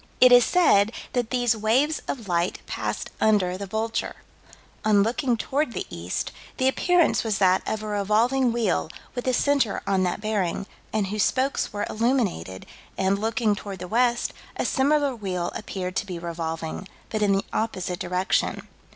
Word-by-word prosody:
It 255 0 +8
is 245 0 +8
said 225 - +4 0.2
that 245 -3 0
these 245 -3 +2
waves 250 +9 +1
of 230 -6 -4
light 175 0 0
passed - - -4
under 200 -4 +3
the 200 +1 -6
Vulture. 220 +3 -2 0.7
"On 210 -2 +4
looking 240 +2 0
toward 270 +2 -1
the - - -3
east, 85 +1 -3 0.3
the 260 - +2
appearance 350 +5 +3
was 220 -3 0
that 185 -1 +4
of 215 0 -2
a - - -5
revolving 220 +5 +2
wheel 225 -8 0 0.2
with 245 0 -5
a 255 - +3
center 280 -7 +1
on 195 -1 +1
that 180 +1 0
bearing, 205 -3 -1 0.3
and 215 -2 0
whose 210 +2 -2
spokes 265 +5 +1
were 205 0 -2
illuminated, 215 - -1 0.3
and, 195 +1 +1
looking 225 0 +1
toward 200 -1 -7
the 180 0 -7
west, 240 +3 +1 0.2
a - - -1
similar 285 0 +2
wheel 185 -5 -3
appeared 185 -3 -5
to 205 - -1
be 180 -2 -5
revolving, 165 +1 -4 0.2
but 215 - -1
in 205 -1 +3
the 195 - 0
opposite 185 -5 -2
direction." 180 +2 0
215 Hz, 170 wpm, -25 LUFS, 190-245 Hz, 0.7 s, It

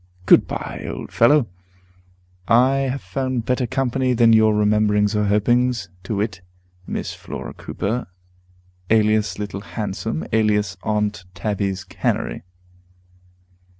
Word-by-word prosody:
Good - - +6
by, - - -5
old - - -6
fellow; 130 +2 +4 1.0
I 130 +4 +4
have 135 0 -2
found 130 -4 -2
better 125 -1 0
company 130 0 0
than 115 -1 +5
your 110 -1 +5
rememberings 105 0 +2
or 105 0 +1
hopings; 115 0 +1 0.2
to 105 - -2
wit, 100 -2 -2 0.5
Miss - - -4
Flora - - -7
Cooper, 115 +5 -3 0.8
alias 110 -1 +2
Little 100 -1 -5
Handsome, 100 -7 -4
alias 105 -3 +2
Aunt 105 -3 -1
Tabby's 100 0 -2
Canary. - - -2
110 Hz, 115 wpm, -21 LUFS, 105-125 Hz, 1.0 s, Good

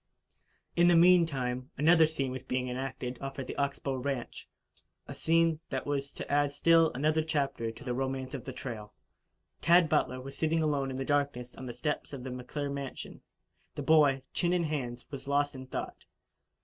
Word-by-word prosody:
In 175 0 +5
the 175 - +6
meantime, 145 -8 +3
another 160 +1 +6
scene 140 -4 -2
was 130 0 -5
being 125 0 -2
enacted 125 -1 -4
off 135 0 -5
at 135 - -4
the - - -6
Ox 140 0 0
Bow 135 -1 -3
ranch 130 -1 -4 0.6
a - - -6
scene 165 -1 +2
that 130 -1 -3
was 140 -1 -2
to - - -7
add 145 0 +2
still 165 +2 +4
another 155 +4 +2
chapter 140 -7 -1
to 115 - -10
the 125 - -2
romance 130 +1 -3
of 135 - -5
the 130 - -6
trail. 110 -5 -7 0.7
Tad 170 -1 +5
Butler 130 -4 +1
was 135 +2 -8
sitting 160 0 +1
alone 140 -3 0
in 130 - -4
the 135 - -3
darkness 140 -4 0
on 130 - -8
the 120 - -5
steps 150 +3 -3
of 130 -3 -6
the 130 - -5
McClure 140 +3 -4
mansion. 140 -1 -6 0.5
The - - -4
boy, 145 -4 +4
chin 175 0 +1
in 175 -1 +2
hands, 125 -6 -3
was 135 -1 -7
lost 145 0 +1
in 130 -1 -9
thought. - - -5
140 Hz, 190 wpm, -30 LUFS, 130-155 Hz, 0.7 s, the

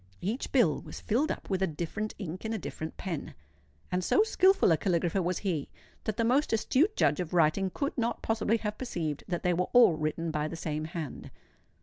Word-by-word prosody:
Each 215 +9 -3
bill 225 - +3
was - - -9
filled 265 +9 +1
up - - -6
with 190 -1 0
a 190 - +3
different 175 +7 -4
ink 185 -3 -6
and 220 0 -2
a - - -1
different 160 -4 -6
pen; 170 -6 -5 0.6
and 180 0 0
so 415 - +4
skilful 385 - +4
a - - +6
caligrapher 175 +2 0
was 180 0 -1
he, 165 -7 -1 0.4
that 220 -1 -2
the 230 - +2
most 260 +6 +2
astute 275 - +2
judge - - +2
of 180 -1 -3
writing 170 +4 +3
could 280 +9 -3
not 235 0 -1
possibly 225 0 +1
have 210 -1 -4
perceived 165 - -3
that 175 -3 -3
they 180 - +3
were 180 +1 0
all 245 -8 +7
written 155 +1 -2
by 150 0 -1
the 165 - -6
same 155 -2 -3
hand. 160 -3 -6
185 Hz, 210 wpm, -30 LUFS, 165-225 Hz, 0.6 s, all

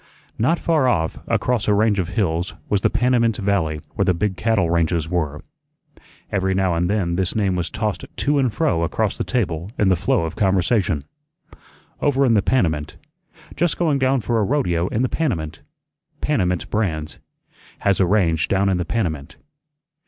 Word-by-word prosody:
Not 135 +10 +2
far 155 -7 +1
off, 80 -10 0
across 125 -4 0
a 105 - +4
range 105 -1 +2
of 90 - -1
hills, 85 -3 0
was 100 -2 +1
the - - +3
Panamint 120 -3 +2
Valley, 95 -7 0
where - - 0
the 90 - +2
big 100 +2 -1
cattle 110 -4 +1
ranges 85 -1 +1
were. 80 -4 -2 0.9
Every 95 -2 0
now 95 -2 +1
and 85 +1 0
then 90 -5 0
this 95 -2 -1
name 100 -4 +1
was 90 -1 -2
tossed 105 -2 -3
to 145 0 +1
and 130 -3 +2
fro 110 - 0
across 100 +5 0
the - - -2
table 90 -7 -2
in 100 - +3
the 95 - +4
flow 85 - +1
of 80 - -4
conversation 95 - +1 1.0
"Over 140 -1 +2
in 120 - +3
the 105 - +4
Panamint." 80 - 0 0.6
"Just 170 -2 0
going 155 -5 +1
down 130 -1 +2
for 115 +1 0
a - - +2
rodeo 95 - 0
in 110 +5 -1
the - - +2
Panamint." 80 - -2 0.6
"Panamint 90 - -1
brands." 80 -8 -2 0.6
"Has 100 -1 +2
a 95 - +3
range 85 -5 +2
down 100 0 +2
in 95 - +1
the 90 - -2
Panamint." 80 -8 -3
95 Hz, 175 wpm, -21 LUFS, 85-115 Hz, 1.0 s, a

